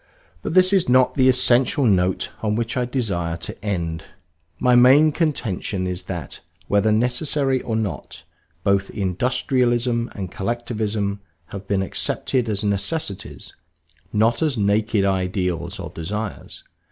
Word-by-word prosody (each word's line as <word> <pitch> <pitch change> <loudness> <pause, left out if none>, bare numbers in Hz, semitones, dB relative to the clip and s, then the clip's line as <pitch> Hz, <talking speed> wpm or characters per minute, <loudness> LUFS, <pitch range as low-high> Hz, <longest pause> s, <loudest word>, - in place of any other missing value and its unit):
But 160 - -4
this 185 +1 +6
is 190 -9 +3
not 130 0 +4
the 130 -1 +4
essential 130 +2 +3
note 95 -4 +1
on 105 -1 0
which 115 0 -2
I 125 - 0
desire 100 -10 -2
to 85 - -7
end. 85 -6 -2 0.5
My 125 +4 +3
main 135 +6 +6
contention 115 - -2
is 90 0 -4
that, 90 -3 -6 0.3
whether 105 +2 +2
necessary 130 +4 +1
or 115 - -3
not, 110 -3 -4 0.4
both 100 0 +1
Industrialism 120 +4 0
and 95 -4 -5
Collectivism 105 -2 -2 0.3
have 100 -1 -8
been 100 -1 +1
accepted 120 +5 -1
as 105 -1 -1
necessities 100 - -3 0.6
not 115 +4 +2
as 150 -6 +1
naked 105 0 +1
ideals 90 -2 -1
or - - -6
desires. 100 +5 -6
110 Hz, 130 wpm, -22 LUFS, 95-125 Hz, 0.6 s, this